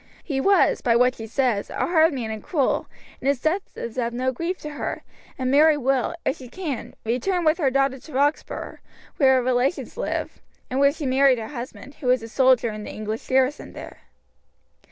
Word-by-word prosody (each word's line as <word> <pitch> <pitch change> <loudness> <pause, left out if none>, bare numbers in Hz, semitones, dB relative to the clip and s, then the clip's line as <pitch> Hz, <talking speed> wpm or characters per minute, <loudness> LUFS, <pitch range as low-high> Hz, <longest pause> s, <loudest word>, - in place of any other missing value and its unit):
He 275 -4 -2
was, 395 +6 +3
by 235 -2 +3
what 250 +1 +4
she 225 -2 -8
says, 230 -3 0
a - - -7
hard 325 -1 +4
man 240 -6 -4
and 220 -1 -5
cruel, 285 -6 0 0.3
and 265 - -4
his 280 -2 +2
death 320 +9 +1 0.2
is 235 +1 -6
no 245 +2 -1
grief 335 +8 -3
to 300 - -6
her, 290 - -4 0.3
and 255 -1 -1
Mary 300 +2 +5
will, 270 +3 0
if 275 - 0
she 255 -4 -11
can, 310 -6 -5
return 335 - 0
with 310 +3 +3
her 280 -5 +3
daughter 270 0 +1
to 310 - -14
Roxburgh, 285 +3 -1 0.4
where 265 -3 +5
her 255 - +2
relations 255 - 0
live, - - -3 0.3
and 260 - 0
where 280 0 +5
she 300 0 -6
married 265 0 +4
her 220 -1 -6
husband, 260 +1 -8
who 270 - -5
was 250 -2 +3
a - - -6
soldier 255 -1 +3
in 215 0 -7
the - - -7
English 215 +1 -5
garrison 265 +2 +1
there." - - -10
265 Hz, 200 wpm, -24 LUFS, 245-295 Hz, 0.4 s, Mary